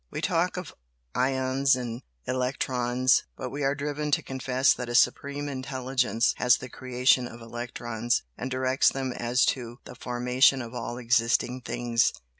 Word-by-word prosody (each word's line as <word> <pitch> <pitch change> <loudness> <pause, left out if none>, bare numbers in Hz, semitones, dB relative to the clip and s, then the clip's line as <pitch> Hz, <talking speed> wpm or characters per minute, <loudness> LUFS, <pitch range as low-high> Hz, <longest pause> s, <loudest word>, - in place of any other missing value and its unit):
We - - -5
talk - - 0
of - - -6 0.4
'ions' 130 +1 +2
and 120 -2 -5 0.2
'electrons' 130 -1 +1
but - - -5
we 145 - -5
are 135 +1 +2
driven 150 +1 -3
to - - +2
confess 130 0 +2
that 125 -1 -6
a 120 - -2
Supreme 140 +3 +2
Intelligence 130 -3 0
has 125 0 +4
the 130 - -9
creation 125 0 +2
of 120 - -11
electrons, 120 0 -3
and 125 - -5
directs 130 +1 +2
them 135 -1 -3
as 120 +2 +1
to 120 -2 -9
the - - -9
formation 125 +2 +2
of 115 0 -9
all 120 -1 -4
existing 120 +1 +1
things. 120 -1 +1
125 Hz, 155 wpm, -27 LUFS, 120-130 Hz, 0.4 s, has